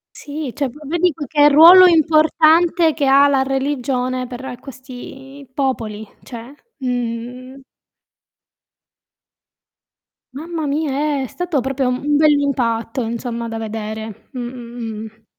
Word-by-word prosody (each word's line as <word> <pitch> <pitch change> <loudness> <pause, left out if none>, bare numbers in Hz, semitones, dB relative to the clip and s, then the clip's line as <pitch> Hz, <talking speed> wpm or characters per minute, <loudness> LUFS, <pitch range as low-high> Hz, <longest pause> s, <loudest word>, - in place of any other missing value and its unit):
Sì, 290 -2 -6
cioè 280 -3 -2
po 290 - -15
vedi 345 +1 +1
poi 295 -1 -7
che 295 +1 +4
ruolo 335 +6 +8
importante 320 +1 +3
che 290 -2 -1
ha 280 +1 +5
la 270 -1 +2
religione 255 -2 -2
per 250 0 -8
questi 270 +1 -12
popoli, 225 -6 -3 0.2
cioè, 240 +2 -10 0.3
mhmm. 250 +1 -5 2.7
Mamma 320 +3 -5
mia, 290 0 -1
è - - -5
stato 355 -2 -3
proprio 265 0 -1
un 280 +4 -1
bell'impatto 270 -6 +1
insomma 235 0 -5
da 225 - -5
vedere. 220 -1 -7
Mh, 260 - -7
mh, 235 -3 -7
mh. 220 0 -14
265 Hz, 115 wpm, -18 LUFS, 240-295 Hz, 2.7 s, ruolo